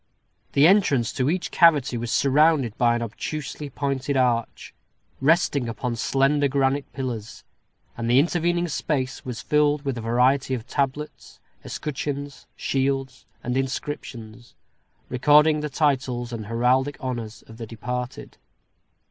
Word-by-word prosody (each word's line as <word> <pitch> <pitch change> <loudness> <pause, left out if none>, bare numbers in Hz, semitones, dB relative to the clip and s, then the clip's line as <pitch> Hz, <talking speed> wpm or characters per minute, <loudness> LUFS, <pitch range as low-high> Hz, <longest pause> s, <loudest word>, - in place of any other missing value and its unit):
The 140 - +5
entrance 160 - +3
to 130 +2 0
each 180 +1 -2
cavity 150 -7 +4
was 120 0 -3
surrounded 140 -4 +3
by 120 -1 +3
an 120 - -2
obtusely 145 +5 -5
pointed 140 0 -2
arch, 120 -3 0 0.5
resting 140 -4 +2
upon 120 +1 -3
slender 135 +4 +2
granite 135 +1 0
pillars; 120 -4 -5 0.5
and 115 0 -3
the 120 - +4
intervening 175 +3 +2
space 135 -4 -2
was 125 -3 -6
filled 150 -1 +2
up - - -22
with 135 -4 -2
a - - -5
variety 125 +4 +2
of 115 -2 -7
tablets, 140 +3 -4 0.2
escutcheons, 145 -1 -5
shields, 135 -1 -2 0.2
and 125 +1 -2
inscriptions, 125 -4 -5 0.5
recording 150 +4 +4
the 150 0 -3
titles 130 -4 0
and 110 -3 -6
heraldic 125 +5 +1
honors 120 -4 -5
of 110 - -14
the 115 - -6
departed. 125 +2 -6
135 Hz, 130 wpm, -24 LUFS, 120-145 Hz, 0.5 s, The